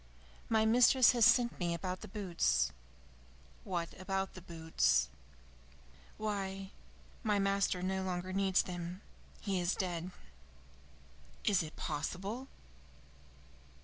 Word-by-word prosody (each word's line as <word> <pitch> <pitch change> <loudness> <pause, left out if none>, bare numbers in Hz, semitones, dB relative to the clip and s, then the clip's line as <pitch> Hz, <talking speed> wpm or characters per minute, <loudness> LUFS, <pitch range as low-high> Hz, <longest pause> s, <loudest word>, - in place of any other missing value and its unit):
"My 220 -1 +3
mistress 245 +2 +6
has 240 -2 +5
sent 240 0 +3
me 170 -2 0
about 180 +2 -4
the - - -7
boots." 175 - +1 0.9
"What 170 -3 -2
about 195 0 -2
the 185 - -10
boots?" 160 - +1 1.1
"Why, 195 -2 -3 0.5
my 210 -3 +1
master 195 -2 +1
no 190 0 0
longer 185 0 -3
needs 190 -1 +3
them. 175 +1 -6 0.4
He 195 -3 -1
is 175 +1 +1
dead." 175 -2 -2 1.3
"Is 200 -4 +3
it 160 -1 -7
possible?" 195 - -4
190 Hz, 110 wpm, -34 LUFS, 175-205 Hz, 1.3 s, mistress